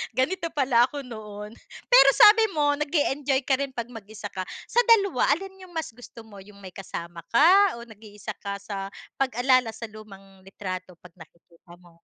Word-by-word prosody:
ganito 335 +8 -1
pala 255 -4 +3
ako 285 0 -7
noon." 210 -4 -9 0.4
Pero 380 - +8
sabi 435 +2 +7
mo, 290 -1 +1
nag-e-enjoy 285 -3 0
ka 265 0 +1
rin 275 -2 -4
'pag 235 0 -5
mag 225 -4 -11
isa 210 -1 -9
ka. 185 -1 -6 0.2
Sa 480 - +3
dalawa, 395 - +3
alin 385 +1 -11
yung 350 - -18
mas 320 -5 -4
gusto 230 0 -14
mo, 210 -3 -14
yung 200 +1 -16
may 185 - -9
kasama 170 -2 -8
ka 365 +9 +5
o 235 - -9
nag-iisa 215 -2 -10
ka 200 -1 -5
sa 195 -1 -5 0.3
pag-alala 255 -2 +1
sa 230 - -7
lumang 195 -3 -14
litrato 185 -2 -7
'pag 175 0 -17
nakikita 170 +1 -18
mo? 175 -1 -22
230 Hz, 180 wpm, -25 LUFS, 200-285 Hz, 0.4 s, Pero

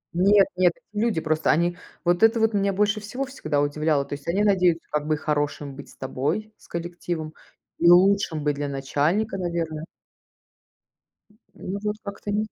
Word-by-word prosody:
Нет 195 +2 +5
нет, 180 -1 +4 0.2
люди 210 -5 0
просто, 155 0 0
они 175 +2 +2 0.3
вот 175 +2 +2
это 225 +1 +5
вот 225 0 +2
меня 200 0 +2
больше 210 +2 +1
всего 245 +6 -4
всегда 255 - -2
удивляло: 145 0 +1
то - - -7
есть 145 +2 -8
они 195 +5 +1
надеются, 180 -5 +2
как 150 0 -1
бы 155 -1 +1
хорошим 145 -2 -2
быть 140 - -10
с - - -17
тобой, 155 +12 -2
с - - -20
коллективом 170 -2 -5 0.5
и 170 - +5
лучшим 180 -3 +4
быть 145 -1 +1
для 145 0 -3
начальника, 145 +10 0
наверное. 165 -3 -3 1.5
М, 210 - -27 0.4
ну, 200 - -3
вот 210 0 -1
как-то 200 0 -6
не. 215 +1 0
175 Hz, 175 wpm, -24 LUFS, 150-205 Hz, 1.5 s, Нет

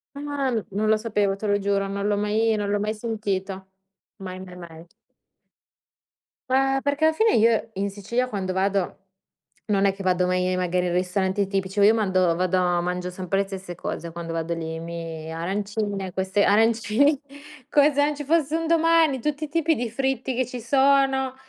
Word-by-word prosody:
Ah, 285 -2 -2 0.2
non 215 +2 0
lo 215 - +4
sapevo, 210 -3 0
te 210 +2 -5
lo 205 0 +2
giuro, 200 0 0
non 200 +1 -3
l'ho 205 -1 +1
mai 215 +2 +1
non 205 -1 -2
l'ho 205 0 +1
mai 210 +1 -1
sentito. 200 -4 -4 0.5
Mai, 185 -1 -7
mai, 180 -1 -10
mai. 170 -1 -11 1.6
Beh, 270 +1 +2
perché 285 +2 0
alla 315 0 +4
fine, 440 +5 +3
io 225 0 +3
in 200 +1 -1
Sicilia 235 +6 -2
quando 190 -4 -3
vado 195 0 0 0.7
non 200 -2 +1
è 195 - +4
che 195 - -8
vado 180 -1 +2
mai 185 0 0
magari 180 0 0
in 175 - -1
ristoranti 190 +2 0
tipici, 195 +1 -2
io 210 +2 +6
mando 185 -5 +2
vado 185 +1 +1 0.2
mangio 180 +1 -3
sempre 185 +1 -2
le 200 - -1
stesse 190 -2 -7
cose, 170 +1 -5
quando 170 -1 -6
vado 165 0 -2
lì, 160 -1 -5
mi 165 -1 -6
arancine, 200 +2 -3
queste 190 +2 0
arancini 225 +6 +3 0.5
come 290 0 +4
se 285 +1 +3
non 295 0 -1
ci 290 - -6
fosse 315 0 +1
un 330 - -2
domani, 330 -4 +3
tutti 300 +4 -2
i - - -6
tipi 325 +1 +1
di 240 0 -2
fritti 265 +1 -2
che 255 - +1
ci 250 -1 -7
sono, 270 +1 +2
205 Hz, 180 wpm, -24 LUFS, 185-260 Hz, 1.6 s, io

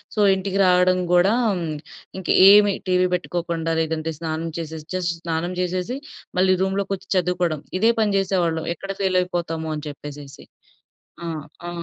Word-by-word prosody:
So, 215 - -2 0.2
ఇంటికి 195 +1 -2
రావడం 180 0 +4
కూడా, 180 +4 +5 0.9
ఇంక 185 - -8 0.2
ఏమి 205 -1 +7 0.2
టీవీ 180 0 +3
బెట్టుకోకుండా 170 -2 -2
లేదంటే 160 0 -2
స్నానం 165 0 -3
చేసేసి 160 -1 -7
జస్ట్ 175 -2 -1
స్నానం 170 +2 -2
చేసేసి 180 +8 -2 0.4
మళ్ళీ 185 0 +4
రూమ్‌లోకొచ్చి 195 0 -2
చదువుకోవడం. 180 -4 0 0.2
ఇదే 225 +3 +5
పని 210 -2 +2
జేసేవాళ్ళం. 175 -4 0
ఎక్కడ 195 +4 -6
ఫెయిల్ 190 -1 +2
అయిపోతా‌మో 165 -3 -3
అని 150 0 -6
చెప్పేసేసి. 145 -1 -10 0.8
ఆహ్, 155 -3 -4 0.2
ఆ! - - -4
180 Hz, 135 wpm, -22 LUFS, 160-190 Hz, 0.9 s, ఏమి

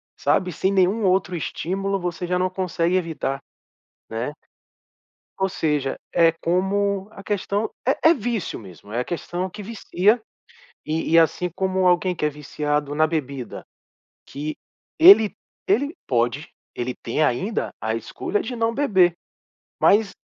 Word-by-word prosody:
sabe, 185 -1 +1
sem 190 +5 0
nenhum 195 +3 +2
outro 185 -1 +2
estímulo, 195 +4 -2
você 175 0 -3
já 180 0 +1
não 185 0 +1
consegue 180 -1 0
evitar, 160 -6 -1 0.7
né? 115 +5 -3 1.1
Ou 190 - +1
seja, 150 -6 -1
é 165 -1 +5
como 195 +4 0
a 195 - -11
questão 205 +1 -1 0.2
É 285 +4 +4
é 340 - +6
vício 230 - -3
mesmo. 100 0 -13
É 120 - 0
a - - -1
questão 175 +3 -3
que 205 +4 -8
vicia 215 +1 +1 0.6
e 160 +1 -2
e - - +8
assim 165 +2 +3
como 190 -1 0
alguém 180 +1 +3
que 150 - -3
é - - +4
viciado 150 0 -2
na 155 +1 +4
bebida, 140 -6 -4 0.6
que 150 +2 -5 0.4
ele 320 - +8 0.3
ele 280 - +2
pode, 120 +6 0 0.3
ele 125 +1 -3
tem 120 +7 -2
ainda 155 - 0
a 110 +1 -1
escolha 360 - -3
de 255 - -4
não 230 0 +1
beber, 190 -11 +4 0.7
mas 205 0 +4
180 Hz, 145 wpm, -23 LUFS, 150-200 Hz, 1.1 s, e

